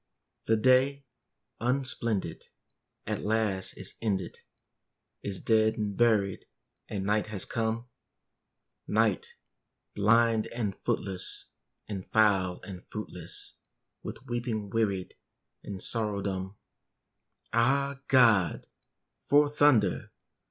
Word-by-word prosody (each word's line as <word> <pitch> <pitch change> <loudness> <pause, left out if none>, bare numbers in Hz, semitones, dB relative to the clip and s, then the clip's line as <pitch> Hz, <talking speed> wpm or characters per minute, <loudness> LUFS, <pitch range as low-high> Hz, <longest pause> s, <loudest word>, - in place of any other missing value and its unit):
The 110 - +3
day, 130 +4 +3 0.5
unsplendid, 120 -4 -1 0.6
at - - -2
last 105 -3 0
is - - -7
ended, 95 -5 -2 0.8
Is 100 -2 -4
dead 110 -1 +3
and 105 -2 -2
buried, 105 -5 +2 0.4
and 95 -2 -3
night 105 +1 +1
has 105 -4 -4
come; 115 +1 -2 1.0
Night, - - +1 0.6
blind 115 +2 +3
and 105 -5 -3
footless, 95 -2 -3 0.4
and 100 -3 -4
foul 95 -4 +3
and 95 -2 -8
fruitless, 90 -5 -6 0.5
With - - -8
weeping 120 -4 -3
wearied, 100 -5 0 0.5
and 95 -2 -6
sorrow 105 -4 -1
dumb. 95 0 -3 1.0
Ah, 135 +4 +2
God! 115 -9 +4 0.6
for 145 +1 +6
thunder! 140 -10 +3
110 Hz, 95 wpm, -29 LUFS, 100-120 Hz, 1.0 s, for